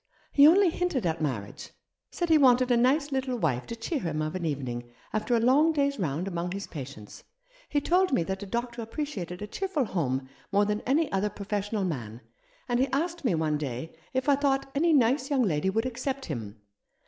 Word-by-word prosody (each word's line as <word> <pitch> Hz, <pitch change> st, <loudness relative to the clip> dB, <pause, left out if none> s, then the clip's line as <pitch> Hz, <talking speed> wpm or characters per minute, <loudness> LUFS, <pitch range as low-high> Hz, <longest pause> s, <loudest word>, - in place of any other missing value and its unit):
He 285 Hz, +1 st, +7 dB
only 365 Hz, +2 st, +6 dB
hinted 320 Hz, -, -1 dB
at 165 Hz, -1 st, -1 dB
marriage 115 Hz, -9 st, -4 dB, 0.2 s
— -, -, -59 dB
said 345 Hz, -1 st, -2 dB
he 320 Hz, -, +7 dB
wanted 255 Hz, -2 st, +5 dB
a -, -, +5 dB
nice 275 Hz, +5 st, +2 dB
little 260 Hz, -2 st, -1 dB
wife 135 Hz, -, -1 dB
to 230 Hz, -, -5 dB
cheer 255 Hz, +7 st, -2 dB
him 160 Hz, -8 st, -3 dB
of 155 Hz, +1 st, -3 dB
an 185 Hz, -2 st, -3 dB
evening, 125 Hz, -5 st, -4 dB, 0.2 s
after 215 Hz, +3 st, +1 dB
a -, -, +3 dB
long 280 Hz, +7 st, +4 dB
day's 280 Hz, -3 st, 0 dB
round 165 Hz, +1 st, -1 dB
among 175 Hz, -1 st, -3 dB
his 200 Hz, 0 st, -4 dB
patients. 135 Hz, -, -9 dB, 0.5 s
He 290 Hz, -, +1 dB
told 365 Hz, +5 st, +2 dB
me 175 Hz, -, +2 dB
that 190 Hz, +2 st, -4 dB
a 200 Hz, -, -6 dB
doctor 235 Hz, +2 st, -3 dB
appreciated 220 Hz, -, -5 dB
a -, -, -5 dB
cheerful 345 Hz, -, -1 dB
home 135 Hz, -, -1 dB, 0.2 s
more 205 Hz, +1 st, +4 dB
than 210 Hz, +1 st, -1 dB
any 295 Hz, +3 st, +2 dB
other 195 Hz, +2 st, +1 dB
professional 205 Hz, +1 st, -3 dB
man, 120 Hz, -9 st, -4 dB, 0.5 s
and 245 Hz, -1 st, +1 dB
he 265 Hz, -, +3 dB
asked 335 Hz, +6 st, -2 dB
me 235 Hz, -10 st, +2 dB
one 155 Hz, -2 st, 0 dB
day 140 Hz, +2 st, -5 dB, 0.2 s
if 260 Hz, +1 st, -1 dB
I 285 Hz, -, +6 dB
thought 275 Hz, -1 st, 0 dB
any 330 Hz, +4 st, +2 dB
nice 265 Hz, 0 st, +3 dB
young 275 Hz, -3 st, +2 dB
lady 170 Hz, -3 st, +1 dB
would 225 Hz, +5 st, 0 dB
accept 265 Hz, +2 st, -3 dB
him. 110 Hz, -, -6 dB
225 Hz, 205 wpm, -28 LUFS, 165-275 Hz, 0.5 s, He